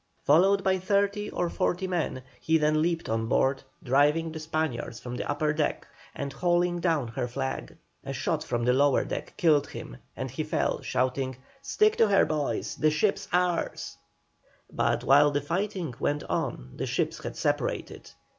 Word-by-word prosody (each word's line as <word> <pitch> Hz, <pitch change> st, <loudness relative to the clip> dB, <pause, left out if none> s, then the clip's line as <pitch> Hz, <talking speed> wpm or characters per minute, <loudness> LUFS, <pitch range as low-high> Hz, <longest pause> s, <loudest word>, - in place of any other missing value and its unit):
Followed 190 Hz, +6 st, +4 dB
by 190 Hz, -1 st, +2 dB
thirty 200 Hz, +2 st, 0 dB
or 175 Hz, -, -1 dB
forty 180 Hz, +2 st, -1 dB
men, 170 Hz, -8 st, -2 dB, 0.2 s
he 160 Hz, 0 st, +2 dB
then 155 Hz, 0 st, +2 dB
leaped 165 Hz, 0 st, 0 dB
on 115 Hz, 0 st, -1 dB
board, 135 Hz, +3 st, +2 dB, 0.2 s
driving 150 Hz, +5 st, +3 dB
the 160 Hz, -, -6 dB
Spaniards 155 Hz, -7 st, -3 dB
from 125 Hz, -, -7 dB
the -, -, -4 dB
upper 150 Hz, +1 st, +1 dB
deck, 155 Hz, -1 st, -1 dB, 0.3 s
and 140 Hz, -1 st, -4 dB
hauling 175 Hz, +3 st, +1 dB
down 160 Hz, -8 st, 0 dB
her 120 Hz, +2 st, -3 dB
flag. 130 Hz, +2 st, -4 dB, 0.3 s
A -, -, -5 dB
shot -, -, -1 dB
from 120 Hz, -1 st, -2 dB
the 125 Hz, -, +4 dB
lower 140 Hz, +1 st, +3 dB
deck -, -, -5 dB
killed 155 Hz, -5 st, +3 dB
him, -, -, -8 dB, 0.2 s
and -, -, -4 dB
he -, -, -3 dB
fell, -, -, -1 dB
shouting, 130 Hz, 0 st, -1 dB, 0.2 s
"Stick 430 Hz, +7 st, +2 dB
to 225 Hz, -, +5 dB
her, 200 Hz, -1 st, +4 dB
boys! 150 Hz, -2 st, -2 dB
The 155 Hz, -, +3 dB
ship's 195 Hz, +6 st, 0 dB
ours." 180 Hz, -1 st, 0 dB, 0.8 s
But -, -, 0 dB
while 145 Hz, +2 st, +6 dB
the 145 Hz, 0 st, 0 dB
fighting 175 Hz, 0 st, -2 dB
went 145 Hz, +1 st, 0 dB
on 65 Hz, +1 st, -3 dB
the -, -, -2 dB
ships -, -, -1 dB
had -, -, -6 dB
separated. -, -, -2 dB
155 Hz, 170 wpm, -27 LUFS, 135-180 Hz, 0.8 s, while